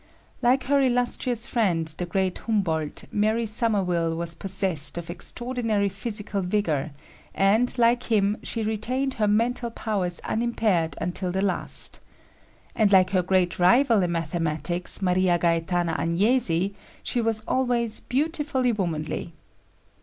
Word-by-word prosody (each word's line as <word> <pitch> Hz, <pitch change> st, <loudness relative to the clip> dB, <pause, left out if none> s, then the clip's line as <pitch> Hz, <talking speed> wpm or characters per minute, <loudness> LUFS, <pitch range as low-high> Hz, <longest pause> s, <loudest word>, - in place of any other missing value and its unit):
Like 255 Hz, +2 st, +3 dB
her 280 Hz, +2 st, +2 dB
illustrious 245 Hz, -1 st, 0 dB
friend, 195 Hz, -11 st, 0 dB
the 160 Hz, +3 st, -2 dB
great 190 Hz, 0 st, -1 dB
Humboldt, 165 Hz, -9 st, -1 dB
Mary 215 Hz, +2 st, +1 dB
Somerville 190 Hz, -7 st, 0 dB
was 170 Hz, 0 st, -3 dB
possessed 185 Hz, -4 st, -1 dB
of 170 Hz, 0 st, -5 dB
extraordinary 225 Hz, 0 st, -2 dB
physical 205 Hz, 0 st, -3 dB
vigor, 180 Hz, -7 st, -1 dB, 0.5 s
and, 215 Hz, +7 st, +2 dB
like 240 Hz, +1 st, +3 dB
him, 205 Hz, -1 st, +2 dB
she 230 Hz, -, -4 dB
retained 250 Hz, +5 st, -1 dB
her 215 Hz, -4 st, 0 dB
mental 235 Hz, +3 st, +1 dB
powers 200 Hz, -6 st, -3 dB
unimpaired 220 Hz, -8 st, 0 dB
until 180 Hz, +1 st, -3 dB
the 190 Hz, +2 st, -1 dB
last. 190 Hz, -3 st, +2 dB, 0.8 s
And 215 Hz, -3 st, +3 dB
like 185 Hz, -1 st, +5 dB
her 185 Hz, -2 st, +3 dB
great 180 Hz, -1 st, +1 dB
rival 230 Hz, +4 st, +4 dB
in 175 Hz, -1 st, 0 dB
mathematics, 165 Hz, +3 st, -2 dB
Maria 180 Hz, -1 st, +2 dB
Gaetana 170 Hz, 0 st, 0 dB
Agnesi, 190 Hz, 0 st, +1 dB, 0.3 s
she 245 Hz, -, -1 dB
was 225 Hz, -1 st, -1 dB
always 240 Hz, -3 st, 0 dB
"beautifully 290 Hz, -2 st, 0 dB
womanly." 170 Hz, -5 st, -3 dB
200 Hz, 125 wpm, -25 LUFS, 175-235 Hz, 0.8 s, like